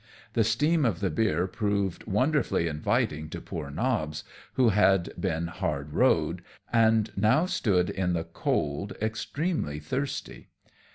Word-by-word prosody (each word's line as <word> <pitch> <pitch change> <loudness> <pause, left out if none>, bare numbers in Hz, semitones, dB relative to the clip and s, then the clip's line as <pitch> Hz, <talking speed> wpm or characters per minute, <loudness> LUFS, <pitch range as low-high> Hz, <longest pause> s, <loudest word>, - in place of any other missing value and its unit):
The 115 - +3
steam 150 +8 +2
of 110 -9 +1
the 95 -3 0
beer 90 -2 +1
proved 100 -2 -1
wonderfully 130 - +1
inviting 75 0 -1
to - - -6
poor - - -6
Nobbs, 75 - -1 0.3
who 125 -3 +4
had 95 -3 +3
been 85 -4 -1
hard 75 -4 -3
rode, - - +2 0.3
and 110 -2 +4
now 115 - +3
stood 95 - +1
in 90 -2 -1
the 85 -1 -1
cold 85 +2 -2
extremely 110 - -2
thirsty. 130 - -4
100 Hz, 130 wpm, -28 LUFS, 80-115 Hz, 0.3 s, who